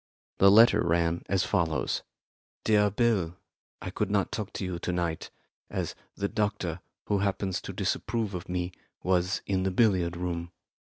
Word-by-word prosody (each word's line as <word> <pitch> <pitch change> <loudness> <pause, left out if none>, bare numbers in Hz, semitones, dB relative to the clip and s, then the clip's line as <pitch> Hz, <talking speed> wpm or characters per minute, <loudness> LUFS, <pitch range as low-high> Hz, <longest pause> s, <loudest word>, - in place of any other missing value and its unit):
The 100 - +8
letter 115 +4 +7
ran 85 0 +1
as 95 +1 +2
follows: 85 -5 0 0.6
"DEAR 105 -1 +4
BILL, 100 -6 +1 0.5
I 90 - -4
could 105 +1 -1
not 100 -2 +1
talk 105 -3 -4
to 95 - -3
you 90 -2 -3
to 90 - -2
night, 85 -2 -2 0.4
as - - -3 0.2
the 100 - -1
doctor, 105 -6 -1 0.3
who 100 - +1
happens 95 -1 -1
to - - -6
disapprove 110 -2 -1
of 90 -1 -6
me, 90 0 -2 0.3
was 90 +1 +1
in 95 -2 0
the 95 - +1
billiard 90 -4 +2
room. 85 -1 -3
95 Hz, 160 wpm, -28 LUFS, 85-105 Hz, 0.6 s, The